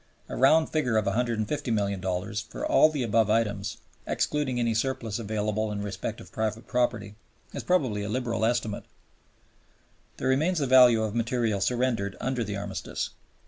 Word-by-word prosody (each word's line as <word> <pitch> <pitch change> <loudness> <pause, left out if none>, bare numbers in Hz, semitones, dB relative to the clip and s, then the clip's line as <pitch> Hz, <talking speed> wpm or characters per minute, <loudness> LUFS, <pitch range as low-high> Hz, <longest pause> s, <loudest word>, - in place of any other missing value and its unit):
A - - -4
round 155 +5 +4
figure 125 -8 +1
of 110 - +1
$150,000,000 105 -4 -1
for - - -5
all 310 - +5
the 145 -4 -2
above 110 -1 +2
items, 105 -2 0 0.3
excluding 145 -4 0
any 115 -1 +1
surplus 115 -2 -2
available 110 0 -1
in 100 -1 -3
respect 100 +2 -4
of - - -13
private 110 +1 -2
property, 120 -5 -1 0.4
is - - -4
probably 130 - +1
a 100 - -4
liberal 120 -1 -1
estimate. 115 -2 0 1.3
Then - - -2
remains 155 +7 +2
the 145 - +1
value 125 -3 +6
of 110 -2 -2
material 115 -3 0
surrendered 120 -4 0
under 130 -2 -1
the 105 -2 -4
Armistice. 100 -4 -4
115 Hz, 150 wpm, -27 LUFS, 105-125 Hz, 1.3 s, value